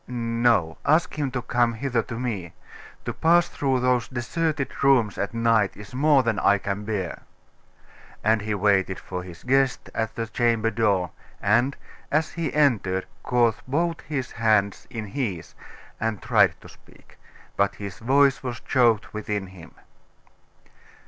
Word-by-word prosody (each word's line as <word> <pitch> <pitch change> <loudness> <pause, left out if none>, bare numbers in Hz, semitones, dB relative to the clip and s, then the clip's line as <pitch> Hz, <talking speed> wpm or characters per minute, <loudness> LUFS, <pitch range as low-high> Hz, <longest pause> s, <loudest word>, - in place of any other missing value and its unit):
'No, 115 -8 +1
ask 155 +1 +2
him 145 -3 -1
to 125 -2 -4
come 120 -1 +1
hither 125 -1 0
to 115 +1 -7
me. 105 -9 -4 0.5
To - - -3
pass 170 +1 +4
through 135 -3 -1
those 125 -1 +2
deserted 140 +4 -2
rooms 125 -7 +3
at 100 - -1
night 115 -3 +2
is 105 +1 -11
more 140 0 +4
than 115 -3 0
I 100 +1 +4
can 100 +1 -4
bear.' 100 -5 -3 1.0
And 110 0 +3
he 105 0 -2
waited 95 -2 +2
for 90 -1 -6
his 90 -2 -11
guest 135 0 +1
at 110 -1 -2
the 115 - -2
chamber 115 -1 +1
door, 100 -6 +1 0.3
and 120 +7 +2 0.3
as 155 +2 +1
he 165 -1 -3
entered, 110 -11 +1 0.2
caught 120 -3 +2
both 165 +5 0
his 140 -5 -4
hands 110 -3 +1
in 115 -4 -5
his, 100 - -4 0.5
and 110 -2 -1
tried - - +3
to - - -13
speak; - - -20 0.4
but 100 0 +1
his 100 -2 -7
voice 135 +3 +3
was 125 -2 -5
choked 115 -6 +2
within 105 -2 -3
him. 85 -4 -14
115 Hz, 150 wpm, -24 LUFS, 105-130 Hz, 1.0 s, pass